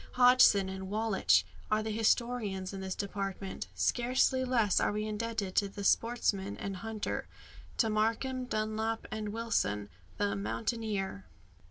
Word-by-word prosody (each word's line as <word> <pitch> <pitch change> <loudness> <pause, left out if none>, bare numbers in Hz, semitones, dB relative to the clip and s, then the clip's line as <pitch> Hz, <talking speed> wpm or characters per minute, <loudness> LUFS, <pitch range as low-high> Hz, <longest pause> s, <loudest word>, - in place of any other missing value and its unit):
Hodgson 245 -6 +6
and 190 0 -6
Wallich 215 -1 +3 0.3
are 215 0 +2
the 220 - -3
historians 215 -3 0
in 195 - -5
this 190 -1 -3
department. 195 -1 -4
Scarcely 255 +2 +2
less 235 -6 +2
are - - +2
we 210 +1 -2
indebted 215 -2 -3
to 200 - +3
the 200 +1 -7
sportsman 200 -3 +1
and 195 -1 -4
hunter 220 +1 -4 0.5
to 225 - +3
Markham, 230 +4 0
Dunlop, 220 0 -2
and 215 -1 -3
Wilson 155 - -1 0.3
the 100 0 0
"mountaineer." 115 - -3
215 Hz, 135 wpm, -31 LUFS, 195-230 Hz, 0.5 s, Hodgson